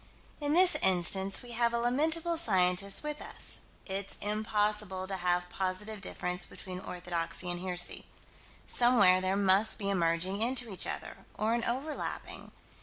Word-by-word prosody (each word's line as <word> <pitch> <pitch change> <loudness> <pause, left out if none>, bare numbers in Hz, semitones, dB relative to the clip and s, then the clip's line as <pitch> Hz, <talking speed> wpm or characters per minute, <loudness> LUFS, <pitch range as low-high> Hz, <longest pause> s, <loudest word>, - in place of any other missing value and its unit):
In 290 0 -2
this 360 +2 +9
instance 190 +2 +5
we 245 - -10
have 235 0 -1
a - - -1
lamentable 315 +8 0
scientist 195 - +1
with 300 0 -6
us. - - 0 0.3
It's 195 0 -3
impossible 210 -2 -1
to 190 0 -4
have 180 0 -1
positive 195 +3 -4
difference 180 -1 -3
between 185 -1 -9
orthodoxy 175 0 -4
and 175 - -5
heresy: 180 -1 -2 0.6
somewhere 205 -7 +3
there 190 +1 -1
must 200 +2 +2
be 200 -2 -3
a - - -1
merging 175 +3 -1
into 240 -2 -1
each 185 - +1
other, - - -6 0.2
or 220 +2 -1
an 235 -1 -2
overlapping. 275 +6 -6
200 Hz, 150 wpm, -29 LUFS, 185-235 Hz, 0.6 s, this